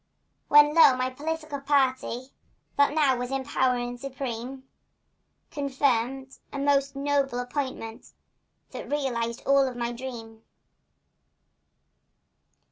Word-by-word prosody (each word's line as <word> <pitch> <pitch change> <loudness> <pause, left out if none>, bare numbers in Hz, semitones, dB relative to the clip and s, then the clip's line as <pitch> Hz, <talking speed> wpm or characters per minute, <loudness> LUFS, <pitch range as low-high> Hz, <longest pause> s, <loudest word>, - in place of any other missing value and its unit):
When, 295 0 +6
lo, 320 -5 +7
my 255 0 -1
political 310 +1 -4
party, 265 -2 0 0.4
That 285 +1 +3
now 285 -4 +3
was 245 0 -4
in 270 0 -2
power 255 0 +1
and 245 0 -4
supreme, 265 -1 -6 0.8
Conferred 270 -2 0 0.2
a - - -6
most 275 0 +1
noble 275 -2 0
appointment 245 -3 -5 0.6
That - - -8
realized 240 -5 -2
all 275 0 +4
of 250 -2 -6
my 235 0 -2
dream. 235 -3 -8
265 Hz, 110 wpm, -26 LUFS, 245-280 Hz, 0.8 s, lo